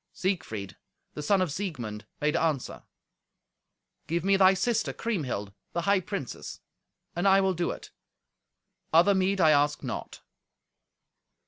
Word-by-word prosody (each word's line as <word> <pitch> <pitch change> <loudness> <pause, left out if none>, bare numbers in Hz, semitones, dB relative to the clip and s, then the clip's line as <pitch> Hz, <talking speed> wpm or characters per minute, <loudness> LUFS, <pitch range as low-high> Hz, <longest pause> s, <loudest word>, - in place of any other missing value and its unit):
Siegfried, 135 - -3 0.4
the 150 - -5
son 185 +5 +3
of 175 - -3
Siegmund, 125 - -5
made 150 0 +1
answer, 155 -6 -1 1.3
"Give 170 +1 -1
me 195 0 +4
thy 190 0 +6
sister 225 +4 0
Kriemhild, 130 - -3 0.2
the 170 - 0
high 200 +2 +3
princess, 185 - -6 0.6
and 175 +3 +1
I 195 0 +6
will 190 -1 +2
do 175 0 -1
it. - - -7 1.0
Other 175 +5 +6
meed 190 +1 +1
I 160 -3 +6
ask 145 0 +2
not." - - -6
175 Hz, 130 wpm, -28 LUFS, 150-195 Hz, 1.3 s, thy